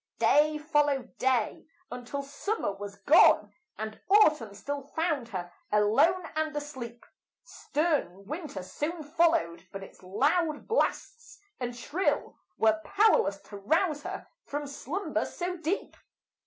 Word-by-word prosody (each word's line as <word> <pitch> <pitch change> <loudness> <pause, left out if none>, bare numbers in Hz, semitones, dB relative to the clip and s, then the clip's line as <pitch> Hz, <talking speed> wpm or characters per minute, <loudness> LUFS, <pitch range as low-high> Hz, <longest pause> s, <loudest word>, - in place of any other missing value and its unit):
Day 300 +1 +4
followed 295 -4 0
day 255 -1 0 0.2
until 250 +3 -5
summer 290 - -2
was 200 0 -8
gone, 205 - +5 0.2
And 215 0 -6
autumn 305 - +4
still 285 +7 -4
found 290 -2 -2
her 175 -5 -6 0.2
alone 220 - +3
and 310 -1 -1
asleep; 260 -5 -7 0.4
Stern 295 - -1
winter 300 - -5
soon 310 - -4
followed, 300 - +1
but 195 0 -7
its - - -14
loud 295 - 0
blasts 475 +1 -1 0.2
and 245 -1 -3
shrill, 290 +4 -1 0.2
Were 220 -1 +3
powerless 400 - +3
to 205 - -10
rouse 305 - +1
her - - -6 0.2
from 290 +1 -4
slumber 290 +7 -3
so 360 0 -4
deep. 335 +4 -2
290 Hz, 125 wpm, -29 LUFS, 220-330 Hz, 0.4 s, gone